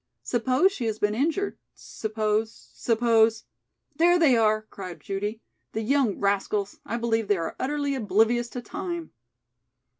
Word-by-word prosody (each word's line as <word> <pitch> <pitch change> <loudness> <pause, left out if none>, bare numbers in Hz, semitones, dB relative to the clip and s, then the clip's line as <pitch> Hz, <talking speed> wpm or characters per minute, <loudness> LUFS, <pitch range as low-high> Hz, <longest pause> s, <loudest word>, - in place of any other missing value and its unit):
"Suppose 255 - +2
she 255 -11 -4
has 215 -1 -2
been 210 -1 +1
injured 325 - -1 0.2
suppose 215 - -3
suppose 225 - +2 0.3
" 305 - -48
"There 350 +2 +5
they 310 -7 +5
are!" 215 -1 +3
cried 190 -4 -9
Judy. 205 +3 -4 0.3
"The 220 - -2
young 260 -3 +2
rascals, 200 0 0
I 235 - -2
believe 225 -2 0
they 205 -1 +3
are 165 -1 -4
utterly 285 0 -1
oblivious 230 +1 +2
to 245 0 -6
time." 345 - -5
225 Hz, 145 wpm, -26 LUFS, 210-260 Hz, 0.3 s, There